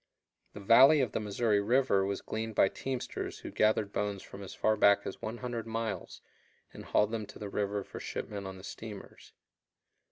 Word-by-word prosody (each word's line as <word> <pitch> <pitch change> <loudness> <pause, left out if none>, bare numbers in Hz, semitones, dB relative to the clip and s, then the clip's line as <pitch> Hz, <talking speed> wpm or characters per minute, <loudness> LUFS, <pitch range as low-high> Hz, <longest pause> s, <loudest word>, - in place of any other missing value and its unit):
The - - -8
valley 130 +9 +7
of 125 - 0
the - - -1
Missouri 105 0 +1
River 120 -2 +3
was 100 0 -2
gleaned 110 0 -4
by 95 - +5
teamsters 130 -2 -4
who - - -8
gathered 110 -1 +2
bones 100 -2 -2
from 100 - -10
as 95 - -8
far 110 - +2
back 100 -1 +4
as - - -6
100 120 0 -4
miles 110 -5 -4 0.5
and - - -10
hauled 105 +1 +2
them 110 -3 -3
to - - -11
the 105 - -6
river 100 0 -1
for - - -9
shipment 100 -2 -5
on 95 0 -7
the 95 - -12
steamers. 105 -1 -9
105 Hz, 185 wpm, -31 LUFS, 100-115 Hz, 0.5 s, valley